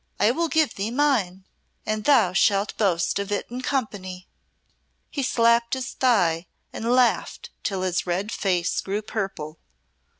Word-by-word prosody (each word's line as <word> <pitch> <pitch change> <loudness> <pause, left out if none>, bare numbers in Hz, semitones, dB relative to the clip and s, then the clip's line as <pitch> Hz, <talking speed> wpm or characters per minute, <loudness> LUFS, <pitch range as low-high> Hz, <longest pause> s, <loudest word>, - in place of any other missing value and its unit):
I 215 - +4
will 335 +6 0
give 315 -5 +2
thee 200 +3 -3
mine, 230 -9 0 0.4
and 215 0 -2
thou 230 -11 +4
shalt 200 +1 +2
boast 185 -3 +1
of 200 0 -4
it 205 - -1
in 250 +1 -4
company." 195 -9 -3 0.8
He 285 - -2
slapped 235 -1 +2
his 260 0 -4
thigh 180 -9 +2 0.3
and 230 +2 -2
laughed 250 -1 +1
till 190 -2 -2
his 180 -1 -1
red 190 +5 -1
face 180 -5 0
grew 205 +2 -3
purple. 190 -8 -5
210 Hz, 145 wpm, -24 LUFS, 185-245 Hz, 0.8 s, I